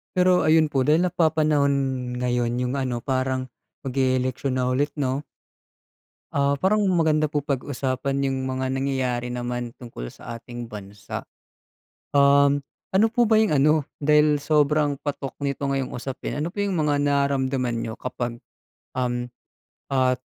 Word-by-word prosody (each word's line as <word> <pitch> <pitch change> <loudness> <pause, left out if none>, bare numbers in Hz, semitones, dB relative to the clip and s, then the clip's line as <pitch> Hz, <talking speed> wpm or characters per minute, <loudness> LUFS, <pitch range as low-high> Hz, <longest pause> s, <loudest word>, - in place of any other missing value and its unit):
Pero 180 0 +4
ayun 155 0 +4
po 135 - +3
dahil 155 +6 +3
napapanahon 155 -5 +2 0.4
ngayon 125 -1 0
yung 125 0 -1
ano, 130 -3 -1
parang 130 -1 -1 0.4
mag 130 - -3
e-eleksyon 130 0 0
na 125 - +1
ulit 135 +4 +1
'no? 135 -1 0 1.1
Ah, 140 0 +2
parang 205 +7 +2
maganda 160 -4 +3
po 145 -1 -1
pag-usapan 135 -1 -2
yung 130 0 -2
mga 130 0 -2
nangyayari 130 -2 -1
naman 120 -1 -4
tungkol 115 - -8
sa 115 - -8
ating 120 0 -8
bansa. 105 0 -8 0.8
Um, 140 0 +4 0.3
ano 195 +4 +4
po 240 -1 +3
ba 220 -1 +5
yung 220 -4 +3
ano, 150 +1 +3 0.2
dahil 150 0 +4
sobrang 150 -1 +2
patok 140 -2 -5
nito 140 0 -2
ngayong 135 -1 -1
usapin, 130 +3 -4
ano 165 - -2
po 195 - -12
yung 200 -1 0
mga 150 -3 +1
nararamdaman 140 -3 +1
niyo 115 -1 -4
kapag, 120 -2 -4 0.6
um 125 -1 -1 0.6
at 130 -1 +2
135 Hz, 140 wpm, -24 LUFS, 125-150 Hz, 1.1 s, ba